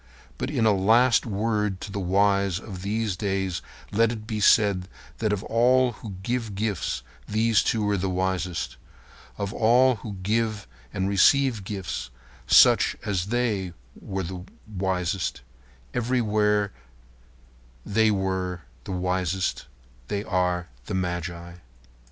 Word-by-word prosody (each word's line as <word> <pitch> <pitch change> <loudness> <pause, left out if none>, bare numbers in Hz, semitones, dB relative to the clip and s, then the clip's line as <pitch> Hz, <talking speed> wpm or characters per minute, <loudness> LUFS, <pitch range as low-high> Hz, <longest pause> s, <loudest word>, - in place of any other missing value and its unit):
But - - -2
in 130 -6 +1
a 110 - +5
last 115 +6 +4
word 105 -2 -1
to 100 - -6
the 100 - -3
wise 100 0 +2
of 95 -4 -8
these 105 0 -1
days 95 -1 -2 0.3
let 115 +2 +3
it 110 -2 -6
be 110 -2 -3
said 100 -3 +4 0.3
that 110 -2 0
of 105 0 -1
all 125 +2 +3
who 110 -3 -9
give 115 -2 -2
gifts 100 - -2 0.2
these 110 -2 +3
two 110 -2 0
were 105 -1 +1
the 95 +1 -1
wisest. 90 -5 -2 0.6
Of 100 -1 -3
all 125 +2 +4
who 105 0 -7
give 110 +1 0 0.3
and 95 0 -1
receive 115 +3 +4
gifts, 95 - -5 0.4
such - - +6
as 95 -3 -1
they 105 -6 -1 0.3
are 95 -2 -4 0.3
wisest. 95 - -1 0.5
Everywhere 105 -4 +1 1.1
they 110 +2 +3
are 95 -3 -1 0.2
wisest. 90 0 -1 0.4
They 100 +6 -2
are 90 -3 0 0.2
the - - -3
magi. 85 -1 -4
100 Hz, 125 wpm, -25 LUFS, 95-110 Hz, 1.1 s, such